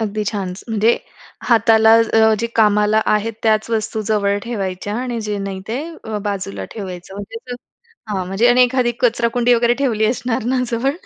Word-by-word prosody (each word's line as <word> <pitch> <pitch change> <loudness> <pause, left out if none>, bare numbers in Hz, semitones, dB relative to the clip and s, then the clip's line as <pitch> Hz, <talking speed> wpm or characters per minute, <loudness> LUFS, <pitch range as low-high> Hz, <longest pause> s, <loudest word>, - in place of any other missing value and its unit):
अगदी 215 -1 -2
छानच. 195 -3 -4
म्हणजे 220 0 +2 0.6
हाताला 225 -1 +5 0.3
अ, 220 0 +5
जे 235 - +1
कामाला 210 0 +3
आहेत 215 +2 -1
त्याच 220 -1 +2
वस्तू 220 0 -1
जवळ 200 -1 +1
ठेवायच्या 205 -3 -4
आणि 245 -2 -3
जे 210 -1 -2
नाही 190 -1 -5
ते 230 +3 -2 0.3
अ, 220 -1 -3
बाजूला 145 - -4
ठेवायचं 190 -1 -7 0.9
हां, 190 -3 -2
म्हणजे 195 +6 +1
आणि 250 +1 +5
एखादी 250 -1 +2
कचराकुंडी 240 0 +2
वगैरे 235 0 +2
ठेवली 220 -5 +1
असणार 235 -1 -1
ना 255 -1 +1
जवळ? 235 +4 0
220 Hz, 155 wpm, -19 LUFS, 205-235 Hz, 0.9 s, हाताला